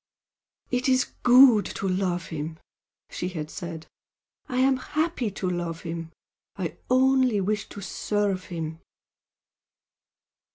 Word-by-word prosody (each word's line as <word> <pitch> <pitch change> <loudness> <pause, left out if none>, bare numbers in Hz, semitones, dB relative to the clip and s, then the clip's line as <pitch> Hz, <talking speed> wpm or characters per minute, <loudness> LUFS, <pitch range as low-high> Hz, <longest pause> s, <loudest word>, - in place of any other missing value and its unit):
"It 250 +1 +1
is 255 0 +2
good 245 -3 +7
to 195 - -2
love 185 -2 -1
him!" 160 0 -5 0.5
she 180 - -3
had 155 -4 -5
said 165 -3 -6 0.6
"I 250 - -2
am 265 +1 +4
happy 305 -3 -1
to 190 -1 -4
love 175 -2 -3
him. 165 -2 -5 0.4
I - - -4
wish - - -17 0.2
only 255 -6 +3
to 200 - -8
serve 200 -1 -1
him!" 160 -2 -5
195 Hz, 120 wpm, -26 LUFS, 170-255 Hz, 0.6 s, good